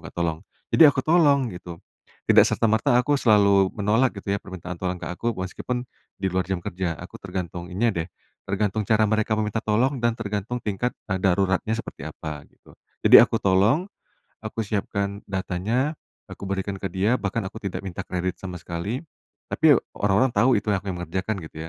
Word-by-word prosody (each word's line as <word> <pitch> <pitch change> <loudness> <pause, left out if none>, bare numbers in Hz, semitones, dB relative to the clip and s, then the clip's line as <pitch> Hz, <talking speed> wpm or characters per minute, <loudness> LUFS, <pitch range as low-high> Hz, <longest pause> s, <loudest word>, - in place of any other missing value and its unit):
nggak - - -18
tolong, 85 -2 -1 0.3
jadi 160 - +8
aku 130 - -2
tolong 145 -7 +4
gitu, 90 -1 -8 0.5
tidak - - +7
serta - - +1
merta 110 +2 +2
aku 145 +4 +1
selalu 100 -5 +4
menolak 110 +5 +2
gitu 100 0 -5
ya - - -1
permintaan 90 -2 -7
tolong 90 -1 -2
ke - - -4
aku 115 +6 -2
meskipun, 110 +7 -3 0.4
di 95 - +1
luar 95 0 +1
jam 95 -2 -1
kerja 85 -1 -2
aku - - -9
tergantung 85 -1 -5
ininya 100 -3 +1
deh, - - -14 0.4
tergantung 105 +2 0
cara 110 -1 +4
mereka 110 0 +1
meminta 110 +1 -1
tolong 125 +6 +1
dan 120 -1 +2
tergantung 105 +2 -3
tingkat, 110 +3 -2 0.2
eee, 95 - +1
daruratnya 95 +3 +2
seperti 70 - -7
apa 75 -1 -7
gitu. - - -22 0.3
Jadi - - +10
aku - - +1
tolong, 100 - +3 0.6
aku 110 +1 -4
siapkan 100 0 -2
datanya, 100 - -1 0.3
aku - - -8
berikan 100 0 -2
ke 95 - -2
dia 100 +6 +2
bahkan 100 +2 -2
aku 105 - -10
tidak 100 -3 -3
minta 95 +1 -5
kredit 90 0 -2
sama 90 -2 -6
sekali, 85 +10 -4 0.5
tapi - - +5 0.2
orang-orang 105 +6 +2
tahu 125 +1 +4
itu - - -6
yang 95 - +1
aku - - -15
yang 90 - -6
mengerjakan 95 +5 -2
gitu - - -20
100 Hz, 185 wpm, -24 LUFS, 95-115 Hz, 0.6 s, Jadi